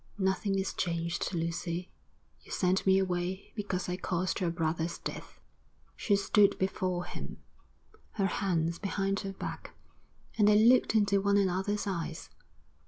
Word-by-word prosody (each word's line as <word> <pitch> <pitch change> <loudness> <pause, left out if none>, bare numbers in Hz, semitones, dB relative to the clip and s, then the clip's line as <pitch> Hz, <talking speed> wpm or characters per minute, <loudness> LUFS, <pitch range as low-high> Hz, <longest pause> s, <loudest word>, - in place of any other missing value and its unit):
'Nothing 195 0 0
is 190 0 -1
changed, 170 -2 -2
Lucy. 170 +1 -3 0.5
You - - -16
sent 185 +1 +1
me 190 0 +6
away 185 0 -2
because 200 -4 -2
I 180 0 -2
caused 185 0 -1
your 175 - +1
brother's 165 0 -1
death.' - - -7 0.6
She 205 - +2
stood 200 +1 +4
before 185 -2 -1
him, - - -7 0.8
her 195 - 0
hands 170 -4 0
behind 195 -1 -1
her 195 -2 -5
back, - - -7 0.6
and 205 - +6
they 210 0 +6
looked 235 +1 +5
into 200 -2 +3
one 200 0 +3
another's 195 +2 0
eyes. 180 -5 -4
190 Hz, 140 wpm, -30 LUFS, 175-200 Hz, 0.8 s, me